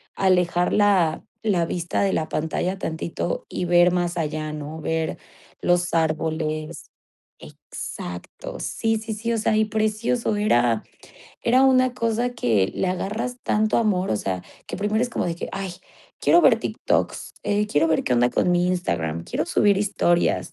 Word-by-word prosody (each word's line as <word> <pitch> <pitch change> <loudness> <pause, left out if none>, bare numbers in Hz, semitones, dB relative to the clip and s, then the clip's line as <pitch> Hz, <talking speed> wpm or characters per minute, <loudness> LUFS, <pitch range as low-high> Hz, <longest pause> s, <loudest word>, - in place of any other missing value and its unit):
alejar 180 -2 +2
la 190 -6 +3 0.2
la 185 -6 +2
vista 170 0 -2
de 195 - +1
la 155 - -1
pantalla 175 +4 -2
tantito 165 0 -3
y 180 - -3
ver 175 0 +5
más 175 -1 0
allá, 155 -1 -2
¿no?, 150 +1 -6
ver 160 0 -2 0.4
los 175 0 +1
árboles 155 0 -1 0.6
Exacto, 90 0 -8
sí, 225 0 -1
sí, 220 0 -5
sí, 230 +2 -2
o 230 - 0
sea, 215 0 +1
y 215 - +3
precioso, 215 +2 0
era 120 - +2 0.6
era 255 +3 +4
una 255 -1 +4
cosa 235 0 0
que 110 - +1
le - - -1
agarras 210 +7 -3
tanto 215 0 +2
amor, 200 -5 +1
o 110 - +2
sea, 95 -3 -3 0.2
que - - -5
primero 210 +2 0
es 250 - 0
como - - -2
de 170 -1 -1
que: - - -5
"Ay, 195 -2 -4 0.5
quiero 345 - +5
ver - - +5
TikToks, - - -1
eh, 205 +1 +1
quiero 165 -4 +2
ver 160 - +1
qué 125 - 0
onda 120 0 +4
con 180 - +1
mi 175 0 +2
Instagram, 85 - -1
quiero - - -2
subir 205 -2 +3
historias", 175 -4 +1
180 Hz, 165 wpm, -23 LUFS, 160-215 Hz, 0.6 s, ver